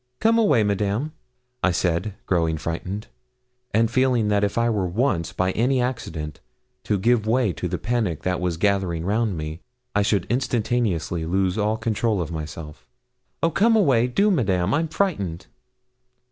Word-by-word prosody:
'Come 230 +1 +4
away, 145 - +4
Madame,' 105 +7 0 0.5
I 95 - +3
said, 90 +3 0
growing 80 -3 +1
frightened, 85 +6 -4 0.7
and 115 +2 +2
feeling 125 -4 +2
that 105 0 +2
if 100 +2 -1
I 115 0 +3
were 105 -5 0
once, 95 -3 0
by 95 0 0
any 125 +6 +1
accident, 80 - -3 0.5
to 105 - +1
give 110 +2 +2
way 115 -4 +2
to 90 - -3
the 90 +1 -2
panic 110 -8 -1
that 90 -1 -1
was 90 -2 -1
gathering 95 -4 0
round 105 -1 0
me, 80 +2 -5 0.3
I 105 - +2
should 100 -3 +1
instantaneously 110 - 0
lose 95 +1 +1
all 110 +1 0
control 110 -1 0
of 85 -2 -3
myself. 75 -4 -7 0.6
'Oh, 165 - +3
come 225 +7 +4
away! 135 - +4
do, 200 +12 +2
Madame 95 - +1
I'm 160 +3 +1
frightened.' 125 - -1
105 Hz, 160 wpm, -23 LUFS, 90-120 Hz, 0.7 s, Come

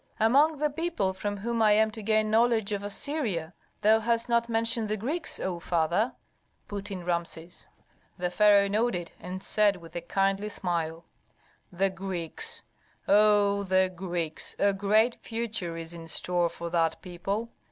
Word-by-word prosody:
"Among 285 +8 +4
the 300 +1 0
people 305 - -1
from 205 +2 -4
whom 230 +3 -2
I 215 -1 +6
am 220 +1 +3
to 220 0 -8
gain 215 0 +1
knowledge 225 -2 +3
of 200 -1 -1
Assyria, 205 - -2 0.3
thou 220 +1 +5
hast 230 +1 +1
not 235 0 +1
mentioned 230 -1 0
the 215 - 0
Greeks, 295 - -2
O 180 -2 -3
father," 170 +7 0 0.5
put 205 0 -6
in 185 -3 -6
Rameses. 170 -1 -4 0.5
The 180 0 -2
pharaoh 205 0 +5
nodded, 200 -5 -1
and 185 +2 -7
said 210 -2 +4
with 170 -2 -13
a 175 - -3
kindly 195 +4 0
smile, 170 -4 -3 0.7
"The 190 +2 +1
Greeks! 190 - -3 0.4
oh, 205 -1 +4
the 185 -1 +2
Greeks! 170 -3 -3
A 200 0 +3
great 215 +4 +2
future 220 -7 -4
is 165 0 -5
in 165 -1 -9
store 175 +1 +1
for 170 0 -7
that 165 -2 +1
people. 195 +6 -4
200 Hz, 155 wpm, -28 LUFS, 175-225 Hz, 0.7 s, I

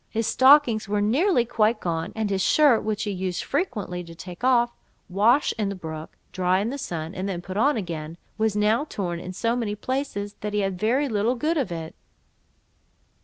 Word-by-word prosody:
His 225 0 -1
stockings 260 -5 +5
were 210 0 +1
nearly 245 - +2
quite 225 -1 +1
gone; 165 +1 -2
and 220 -2 -1
his 190 -1 0
shirt, 285 0 +4
which 215 -1 -2
he 210 - -2
used 185 -2 -3
frequently 210 - -2
to 165 0 -11
take 180 +4 -10
off, 240 -2 +3 0.4
wash 220 +9 +3
in 205 -2 0
the 200 - -4
brook, 160 -3 -8
dry 185 0 +1
in 215 +4 -1
the 280 - -5
sun, 165 -6 -5
and 190 +1 -3
then 180 -3 -3
put 185 +2 -8
on 265 +6 +3
again, 165 -4 -5 0.2
was 220 -1 0
now 215 +5 +2
torn 175 - -4
in 180 - -7
so 230 +5 -1
many 220 -4 -2
places, 210 -4 -3
that 210 0 -4
he 210 - +1
had 195 -2 -2
very 255 +8 +1
little 225 +1 +1
good 310 +7 0
of 270 - -1
it. 165 -1 -5
210 Hz, 200 wpm, -25 LUFS, 185-240 Hz, 0.4 s, stockings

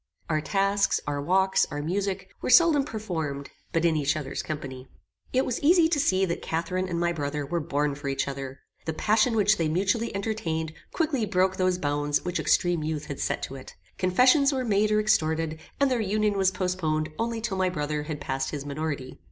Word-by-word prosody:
Our 155 -1 +1
tasks, 195 +4 +1
our 145 -1 -2
walks, 190 +5 +2
our 145 -1 -4
music, 190 +2 -2
were - - -2
seldom 315 -1 +6
performed 160 - -4 0.2
but 165 0 +1
in 165 -2 +3
each 150 0 +1
other's 140 -3 -4
company. 135 -4 -6 0.4
It 260 +1 +2
was 245 - -2
easy 335 +2 +5
to 315 -3 +1
see 190 -8 +3
that 170 -2 -3
Catharine 180 +3 -2
and 170 -1 -2
my 170 0 +1
brother 145 -2 -3
were 170 +4 -1
born 150 -2 -1
for 140 +1 -7
each 135 0 -1
other. 135 -1 -6 0.3
The 160 - 0
passion 220 +6 +2
which 210 0 +4
they 165 - +1
mutually 195 +8 0
entertained 165 -7 -2 0.2
quickly 290 -9 0
broke 185 -1 +1
those 185 -1 +2
bounds 145 -2 -1
which 180 0 -1
extreme 175 -3 +2
youth 155 -1 -3
had 140 -3 -6
set - - -1
to - - -5
it; 130 - -11 0.2
confessions 255 - +4
were 260 -2 -1
made 210 -1 +2
or 210 - +3
extorted, 160 -6 +1 0.2
and 280 -1 +3
their 245 -3 +1
union 210 0 +1
was 190 -1 +3
postponed 180 -5 -1
only 230 0 -1
till 220 -4 -3
my 185 -1 +2
brother 150 -3 -2
had 150 0 -5
passed 135 -1 -2
his 145 -2 -5
minority. 140 -3 -4
175 Hz, 200 wpm, -26 LUFS, 150-210 Hz, 0.4 s, seldom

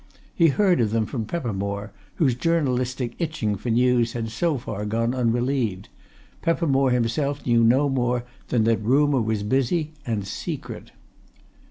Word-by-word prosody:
He 170 - +4
heard 180 +1 +3
of 110 - +2
them 110 0 0
from 115 0 -4
Peppermore, 100 - -3 0.2
whose 135 -6 +2
journalistic 130 -4 0
itching 155 - -1
for 105 +5 -5
news 120 0 +2
had 115 -2 -4
so 160 +5 0
far 110 -4 -5
gone 115 +3 0
unrelieved; 120 -4 0 0.5
Peppermore 140 -5 +2
himself 130 +4 0
knew 120 -1 +3
no 130 +6 +4
more 125 -2 0 0.2
than 115 -3 +1
that 115 -1 +2
rumour 135 +4 +3
was 110 -2 -1
busy, 135 +8 0
and 110 -6 -2
secret. 95 - -6
125 Hz, 145 wpm, -24 LUFS, 115-140 Hz, 0.5 s, He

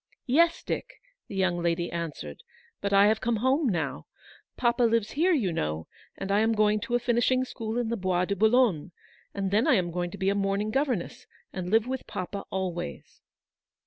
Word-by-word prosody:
"Yes, 335 +6 +3
Dick," - - -5 0.3
the - - -8
young 185 -2 +1
lady 170 0 0
answered; 155 - -5 0.4
"but 200 - -1
I 200 0 +6
have 215 +1 +2
come 235 0 +1
home 260 +5 +2
now. 155 - -2 0.5
Papa 240 0 +1
lives 230 -2 +2
here, 340 +6 +2
you 220 - +1
know, 75 - -2 0.3
and 195 0 -4
I 200 - +4
am 225 +1 +3
going 210 0 +3
to 240 +3 -2
a - - +3
finishing 245 +2 +2
school 225 -2 -5
in 240 -2 -1
the 235 - -1
Bois 185 -2 +1
de 200 - -1
Boulogne, 220 - +2 0.4
and 195 -1 -2
then 215 +7 +3
I 285 - +5
am 175 -4 0
going 175 +1 -2
to 200 - -9
be 190 0 +1
a - - +2
morning 200 +1 0
governess, 260 - -2 0.3
and 180 -1 -4
live 220 +2 +3
with 260 0 -4
papa 190 +2 -5
always." 175 - -5
205 Hz, 195 wpm, -27 LUFS, 180-240 Hz, 0.5 s, I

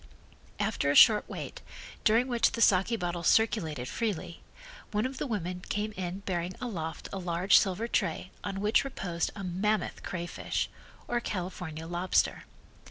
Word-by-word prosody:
After 140 - 0
a 145 - +2
short 215 +3 +7
wait, - - -6 0.4
during 230 +4 +4
which 240 -2 +2
the 230 - -2
saki 195 +5 +4
bottles 175 -4 -2
circulated 160 - +2
freely, 185 - -3 0.5
one 210 +2 0
of 260 0 -4
the - - -2
women 180 -6 -3
came 210 +1 -1
in 185 -1 -5
bearing 180 -2 -2
aloft 165 -11 -4
a 195 - -3
large 180 +2 +4
silver 200 +3 -1
tray 190 -4 -1
on 195 -1 -3
which 210 +2 +3
reposed 180 -11 -2
a 200 - -6
mammoth 200 +4 -1
crayfish, 175 -1 -3 0.4
or 240 - +1
California 180 -6 -5
lobster. 175 +2 +1
190 Hz, 150 wpm, -30 LUFS, 175-215 Hz, 0.5 s, short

